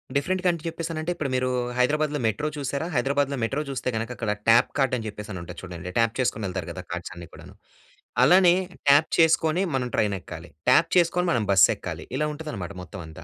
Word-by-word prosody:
Different 180 +6 0
country 170 -2 +1
చెప్పేసానంటే, 165 0 -4
ఇప్పుడు 145 -5 -3
మీరూ 130 0 0 0.3
హైదరాబాద్‌లో 150 +3 +1
మెట్రో 150 +7 0
చూసారా? 140 +3 -3
హైదరాబాద్‌లో 140 +2 +1
మెట్రో 135 +6 -1
చూస్తే 130 -1 -2
గనక, 115 +2 -2
అక్కడ 110 -3 -2 0.2
ట్యాప్ 115 +1 +6
కార్టని 125 -4 +1
చెప్పేసనుంటది 105 -4 -7
చూడండి, 90 -1 -7
ట్యాప్ 115 0 +3
చేసుకొనెళ్తారు 95 -7 -2
గదా! 90 +1 -7
కార్డ్సన్నీ 85 -1 -6
కూడాను. - - -13 0.7
అలానే 175 +4 +6 0.3
ట్యాప్ 145 +3 +6
చేసుకొని 160 +2 +3
మనం 125 -1 -1
ట్రైనెక్కాలి, 95 -5 -2 0.2
ట్యాప్ 165 - +5
చేసుకొని 180 +1 +2
మనం 115 -4 +1
బస్ 95 -4 +7
ఎక్కాలి. - - -7
ఇలా 150 +1 0
ఉంటుందనమాట 115 - -6
మొత్తం 90 0 -9
అంతా. 80 -1 -11
130 Hz, 165 wpm, -25 LUFS, 100-155 Hz, 0.7 s, బస్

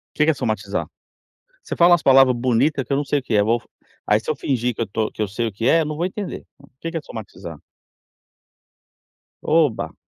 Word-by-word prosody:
O - - -22
que 150 - +4
que 160 - +4
é - - -1
somatizar? 110 -6 -3 0.8
Você - - -6
fala 175 +1 +6
umas 175 - +4
palavra 135 -1 +6
bonita 130 +3 +1
que - - -5
eu - - +3
não 145 - -1
sei 145 0 0
o - - -17
que 120 - -3
é 105 - +5
eu 100 - +2
vou 115 +1 +1 0.4
aí 105 - +3
se 110 - -13
eu 155 - +1
fingir 125 -3 -1
que - - -8
eu - - -2
tô 110 +2 -1
que - - -4
eu 105 - -1
sei 115 +4 -2
o 110 - -4
que 115 +5 -1
é, 165 +1 +4
não 150 0 -4
vou 170 - -1
entender. 200 +1 -6
O 140 - -18
que 165 - -4
que 165 - -6
é - - -1
somatizar? 85 - -9 1.8
Oba. 155 -7 +1
130 Hz, 245 wpm, -21 LUFS, 110-150 Hz, 1.8 s, fala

